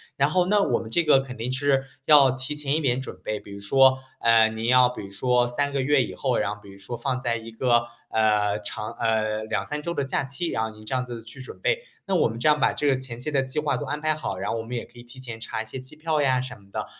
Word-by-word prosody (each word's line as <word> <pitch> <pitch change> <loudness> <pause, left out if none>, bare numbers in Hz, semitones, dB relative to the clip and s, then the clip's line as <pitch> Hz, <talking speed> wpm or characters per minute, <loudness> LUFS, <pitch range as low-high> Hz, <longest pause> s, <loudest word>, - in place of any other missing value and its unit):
然 140 +1 +3
后， 180 +2 +2
那 205 +2 +3
我 125 - +1
们 110 - -7
这 170 +9 +2
个 150 -4 +5
肯 135 -2 -6
定 120 +2 -3
是 135 0 +1 0.2
要 140 -4 +7
提 130 +3 -4
前 150 0 0
一 160 - -1
点 130 -2 +1
准 130 - -8
备， 105 +2 -3
比 100 - -13
如 100 - -8
说， 130 +6 +4 0.2
呃， 115 -1 +6
您 110 +1 -4
要 125 0 +6
比 125 - -6
如 100 - -11
说 125 +3 +2
3 140 +3 0
个 135 - +1
月 145 +1 +3
以 120 - -4
后， - - 0
然 - - 0
后 - - -18
比 100 - -13
如 95 - -13
说 100 +5 -6
放 130 -1 -1
在 120 -2 0
一 115 +1 -9
个 120 0 +2 0.2
呃 105 -2 +2
长 105 +1 -5
呃， 110 -1 0
2、3 105 +9 -2
周 170 +2 -3
的 140 - -1
假 135 - -1
期， 140 +6 -3
然 110 - -1
后 110 - -2
您 110 0 -14
这 130 - -4
样 125 - +1
子 120 -2 -7
去 115 +4 -10
准 130 - -10
备， - - +1 0.3
那 195 - -1
我 - - +4
们 115 - -6
这 120 - +1
样 150 0 +5
把 - - +3
这 - - -3
个 135 - +4
前 130 -3 -7
期 150 +5 -3
的 140 - +2
计 130 +3 -3
划 150 -3 0
都 - - -4
安 145 +1 -3
排 155 0 +2
好， 150 -11 -4
然 95 - -2
后 - - -1
我 115 - -4
们 120 +2 -6
也 - - -5
可 120 - -17
以 - - -11
提 120 +2 -14
前 120 -3 -7
查 110 - -4
一 - - -15
些 120 +4 -7
机 130 +4 -11
票 155 0 0
呀 130 -2 +3
什 130 -1 -6
么 100 - -21
的， - - -3
125 Hz, 320 characters per minute, -25 LUFS, 115-140 Hz, 0.3 s, 要